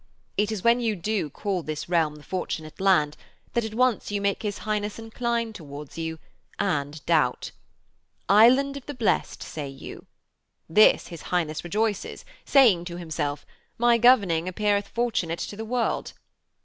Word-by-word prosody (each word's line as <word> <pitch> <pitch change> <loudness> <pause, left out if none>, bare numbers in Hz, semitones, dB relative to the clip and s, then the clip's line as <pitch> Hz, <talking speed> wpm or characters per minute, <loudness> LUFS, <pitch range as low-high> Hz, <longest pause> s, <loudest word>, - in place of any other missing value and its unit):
It 210 +1 +1
is 215 -4 -4
when 235 +1 +4
you 225 -3 0
do 195 -3 -2
call 190 +5 -3
this 155 -1 -5
realm 165 -4 +1
the 150 - -14
Fortunate 160 -4 -5
Land 165 -7 +3 0.4
that 235 - +1
at 220 0 -5
once 255 -1 +1
you 205 0 -1
make 200 0 0
his 205 -2 -3
Highness 210 -1 -2
incline 230 0 -2
towards 145 -5 -9
you 160 0 -4 0.4
and 150 -7 -2
doubt. 150 -7 +1 0.8
"Island 255 +7 +5
of 275 - -11
the 290 - -5
Blest," 235 -4 0
say 145 -3 -6
you. 135 0 -10 0.6
This 210 +7 +5
his 170 -2 -9
Highness 160 -4 -1
rejoices, 210 +3 -2 0.2
saying 220 -11 +5
to 175 -1 -6
himself: 150 -4 -3 0.3
"My 240 0 +4
governing 200 -9 +4
appeareth 205 +2 0
Fortunate 220 -9 -1
to 205 - -5
the 220 - -5
World." 235 0 -1
200 Hz, 155 wpm, -25 LUFS, 160-225 Hz, 0.8 s, Island